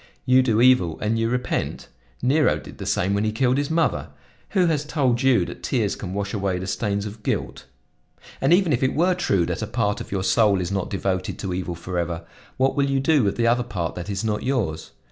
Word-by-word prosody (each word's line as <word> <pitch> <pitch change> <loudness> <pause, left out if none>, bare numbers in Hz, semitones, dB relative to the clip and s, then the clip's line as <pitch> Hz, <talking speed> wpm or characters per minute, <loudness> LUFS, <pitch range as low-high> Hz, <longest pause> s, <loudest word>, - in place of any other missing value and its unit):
You 130 0 +5
do 115 -3 +2
evil, 125 -11 +4
and 110 +2 0
you 115 0 +1
repent? 125 +1 -2 0.4
Nero 145 +4 +3
did - - -12
the - - -5
same 95 +3 +1
when 100 +1 +1
he 110 - 0
killed 125 +4 +1
his 145 - -2
mother. 165 +1 0 0.4
Who 185 -3 +2
has 155 -4 +1
told 135 -5 0
you 125 -9 +4
that - - -9
tears - - 0
can - - -6
wash 100 0 -3
away 95 -3 -1
the 90 - -5
stains 100 +1 -2
of 105 +1 -8
guilt? 65 - -3 0.8
"And - - +2
even 175 -3 +4
if 120 - 0
it 130 - +1
were 180 +4 +3
true 100 - +1
that 90 +3 -3
a 110 - -2
part 105 -2 -1
of - - -9
your 95 -1 -1
soul 105 -2 +3
is 90 0 -3
not 95 -2 -2
devoted 95 -2 -2
to 95 -3 -4
evil 90 -1 -3
forever, 85 -1 -3 0.3
what 135 +1 +2
will 140 -1 +1
you 135 0 +1
do 145 -1 +3
with 100 - 0
the 115 - 0
other 120 +1 +3
part 95 -9 -3
that 90 +2 -7
is 100 0 -2
not 105 -1 -1
yours? 105 - -2
110 Hz, 230 wpm, -23 LUFS, 95-130 Hz, 0.8 s, You